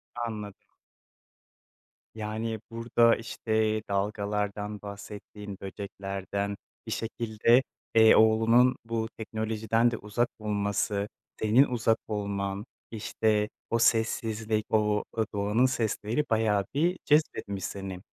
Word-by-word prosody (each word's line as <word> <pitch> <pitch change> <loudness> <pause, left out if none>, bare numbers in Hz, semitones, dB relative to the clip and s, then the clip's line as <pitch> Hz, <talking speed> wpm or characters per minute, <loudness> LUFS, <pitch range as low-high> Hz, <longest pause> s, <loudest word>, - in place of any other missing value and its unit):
Anladım. 110 -4 -4 1.6
Yani, 110 +1 -3
burda 115 0 +3
işte 110 -1 -1
dalgalardan 105 +1 -2
bahsettin, 100 0 -8
böceklerden, 100 0 -4 0.3
bir - - -4
şekilde, 115 +2 +2 0.3
eee, 110 0 +8
oğlunun 115 +3 +5
bu 115 -1 -2
teknolojiden 110 +1 0
de 115 - -3
uzak 110 +4 -1
olması, 100 -1 -1 0.3
senin 110 +5 +5
uzak 115 -4 +1
olman, 100 -1 -2 0.3
işte 110 -1 0 0.2
o 115 - +1
sessizlik, 110 -1 +1
o, 105 -1 +2
aaa, 110 -1 0
doğanın 105 +5 +2
sesleri 115 +1 0
bayağı 110 -3 +2
bir 170 +6 +2
cezbetmiş 105 - +1
seni. 95 -2 -5
110 Hz, 100 wpm, -28 LUFS, 105-115 Hz, 1.6 s, eee